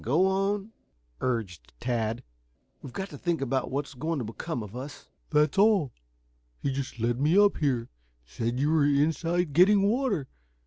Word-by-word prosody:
"Go 155 +11 +3
on," 195 +2 0 0.5
urged 95 - -3
Tad. 115 -2 -1 0.6
"We've 135 - -9
got 190 +8 -5
to 145 - -9
think 170 -2 0
about 135 -1 -1
what's 140 +1 -3
going 155 +5 -2
to 125 - -3
become 120 +4 -4
of 105 +2 -10
us." 135 +3 -8 0.2
"That's 150 +3 +2
all. 200 - +4 0.7
He 140 - -2
just 135 -2 -4
led 120 +3 0
me 155 +6 +3
up 205 0 +5
here. 130 -6 0 0.4
Said 115 - -3
you 145 +3 +2
were 160 -2 +4
inside 160 +3 +1
getting 195 +4 +5
water. 205 - +1
145 Hz, 165 wpm, -28 LUFS, 125-180 Hz, 0.7 s, up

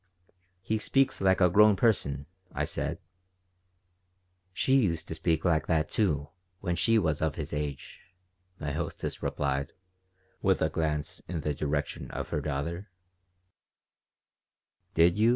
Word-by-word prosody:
"He 110 +3 0
speaks 135 +2 +2
like 95 0 +3
a 90 - +6
grown 105 +2 +7
person," 70 - +1 0.3
I - - 0
said - - -3 1.5
"She 130 +8 +3
used 85 -7 0
to - - -2
speak 80 0 0
like 80 -3 +2
that, 80 -2 +1
too, 75 -9 0 0.3
when 90 -3 -1
she 110 +8 +3
was 80 -8 +1
of 80 -2 0
his - - -5
age," 75 -2 -4 0.6
my 75 -2 -3
hostess 80 +3 -4
replied, 70 0 -1 0.7
with 95 -1 +3
a 80 - +2
glance 75 -2 -1
in 85 -2 -3
the 75 - -1
direction 75 0 -2
of - - -5
her 75 - -1
daughter 80 +7 -3 2.1
"Did 85 +4 +4
you?" 110 +2 +5
80 Hz, 135 wpm, -29 LUFS, 75-95 Hz, 2.1 s, grown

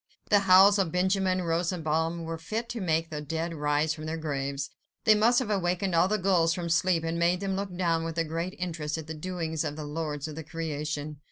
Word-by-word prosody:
The 205 - +7
howls 195 +1 +7
of 185 -5 +1
Benjamin 185 +1 +1
Rosenbaum 165 -1 -1
were 165 0 -5
fit 220 +8 -3
to 230 - -4
make 165 -2 0
the 150 -1 -4
dead 165 +3 -3
rise 150 0 +1
from 155 0 -7
their 160 +1 -3
graves. 140 -2 -3 0.3
They 220 - +7
must 225 +3 +4
have 210 -6 +1
wakened 180 +2 0
all 170 +2 +4
the 215 +2 +1
gulls 175 -4 +2
from 175 -2 -4
sleep, 170 0 +2
and 165 +1 -2
made 175 +1 +2
them 195 -1 -2
look 195 -2 -4
down 165 -3 +1
with 165 -1 -4
great 165 +4 -3
interest 165 -4 -3
at 160 - -6
the 160 - -6
doings 160 -1 -3
of 145 - -3
the 155 -1 -6
lords 150 -1 -3
of 155 - -7
the 160 - -6
creation. 155 -2 -4
165 Hz, 215 wpm, -28 LUFS, 155-185 Hz, 0.3 s, The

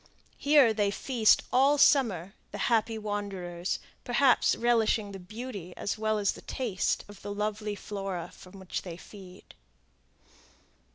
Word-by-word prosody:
Here 285 -5 +5
they 205 -2 +1
feast 225 +1 +3
all 275 +3 +5
summer, 205 - +3 0.2
the 205 - -6 0.2
happy 225 0 +1
wanderers, 195 -4 -3 0.3
perhaps 250 +1 +3
relishing 225 -3 +1
the 195 - -8
beauty 200 -2 -8
as 200 - -2
well 215 0 0
as 200 -1 +2
the - - -11
taste 220 -8 -2
of 205 -1 -13
the 205 - -6
lovely 210 0 -2
flora 195 -4 -5 0.2
on 185 - -16
which 190 -1 -5
they 170 -3 -8
feed. 185 -1 -13
205 Hz, 135 wpm, -29 LUFS, 195-230 Hz, 0.3 s, Here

